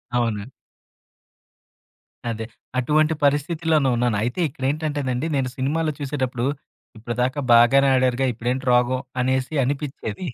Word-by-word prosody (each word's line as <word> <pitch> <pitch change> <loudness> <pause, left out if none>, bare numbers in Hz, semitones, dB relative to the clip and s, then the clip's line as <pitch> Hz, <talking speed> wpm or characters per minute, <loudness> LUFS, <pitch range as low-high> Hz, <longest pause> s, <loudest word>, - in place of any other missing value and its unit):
అవును. 115 -4 0 1.8
అదే. 110 -1 -4 0.3
అటువంటి 155 +4 +2
పరిస్థితిలోనే 150 0 +2
ఉన్నాను. 120 -3 +1
అయితే 120 +8 -2
ఇక్కడేంటంటేనండి 140 0 -2
నేను 130 -2 0
సినిమాలో 155 +4 0
చూసేటప్పుడు, 130 -4 -2 0.5
ఇప్పటిదాకా 125 +4 -2
బాగానే 125 +4 +6
ఆడారుగా 130 0 +2
ఇప్పుడేంటి 125 +4 -2
రోగం 125 +1 +2 0.2
అనేసి 130 +3 0
అనిపిచ్చేది. 140 - -4
130 Hz, 100 wpm, -23 LUFS, 120-145 Hz, 1.8 s, బాగానే